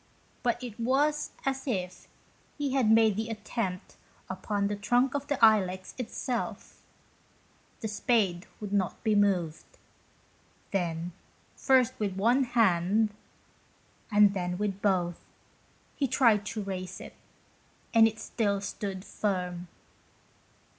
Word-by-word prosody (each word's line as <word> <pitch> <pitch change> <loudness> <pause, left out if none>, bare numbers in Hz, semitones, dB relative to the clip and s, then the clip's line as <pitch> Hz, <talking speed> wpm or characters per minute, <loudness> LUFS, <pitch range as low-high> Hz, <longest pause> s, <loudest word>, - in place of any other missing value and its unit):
But 240 +1 0
it 235 -2 -7
was 285 +5 +1 0.2
as 270 0 -2
if 180 -7 -3 0.5
he 285 -3 -1
had 260 -5 +3
made 220 -2 +5
the 220 +2 -3
attempt 210 -4 -4 0.3
upon 200 +2 -2
the 205 +1 -1
trunk 245 +6 +2
of 285 0 -3
the 285 - 0
Ilex 185 -4 +2
itself. 250 0 -4 1.0
The 220 - -2
spade 205 -5 0
would 205 -2 -6
not 190 -3 -1
be 220 -2 +2
moved. 185 -6 0 0.9
Then, 175 -2 -2 0.4
first 260 -1 +3
with 200 -3 -1
one 240 +7 +3
hand, 210 -2 +2 1.0
and 205 -1 +6
then 180 -2 -2
with 200 -1 -2
both, 180 -4 +1 0.8
he 275 - 0
tried 225 -5 +3
to 215 -1 -3
raise 185 -2 -5
it, - - -10 0.8
and 225 -1 +7
still 215 -2 -1
it 195 - -7
stood 195 -1 -5
firm. 180 -3 -2
210 Hz, 120 wpm, -29 LUFS, 185-235 Hz, 1.0 s, and